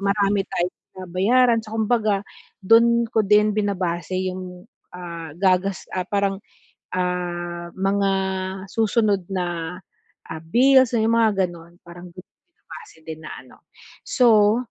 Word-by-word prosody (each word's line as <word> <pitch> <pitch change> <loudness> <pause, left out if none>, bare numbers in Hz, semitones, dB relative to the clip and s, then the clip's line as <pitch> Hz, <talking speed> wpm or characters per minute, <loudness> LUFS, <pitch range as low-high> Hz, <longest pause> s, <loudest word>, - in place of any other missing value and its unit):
marami 200 0 +1
tayong 175 +1 -2 0.3
binabayaran 230 +7 +2
sa 220 0 -10
kumbaga 215 -3 0 0.4
do'n 235 +3 +5
ko 220 - +3
din 210 +1 +3
binabase 185 -4 -2
'yong, 185 -1 -6 0.3
ah, 170 -3 -8
gagas 190 +1 +1
ah, 185 -1 -3
parang, 200 -1 -1 0.5
ah, 175 -1 -3
mga 195 +1 0 0.6
susunod 215 -3 +1
na, 175 -2 -3 0.5
ah, 160 - -6
bills 260 +6 +4
na 230 - +2
'yong 225 +1 +2
mga 225 -2 +4 0.2
gano'n 170 -1 -13
parang 175 +1 -12
do'n 180 - -11
ko - - -72 0.2
binabase 430 - -14
din 160 -1 -8
na 155 - -8
ano. 125 - -20 0.4
So, 220 -4 +4
195 Hz, 130 wpm, -22 LUFS, 175-220 Hz, 0.6 s, do'n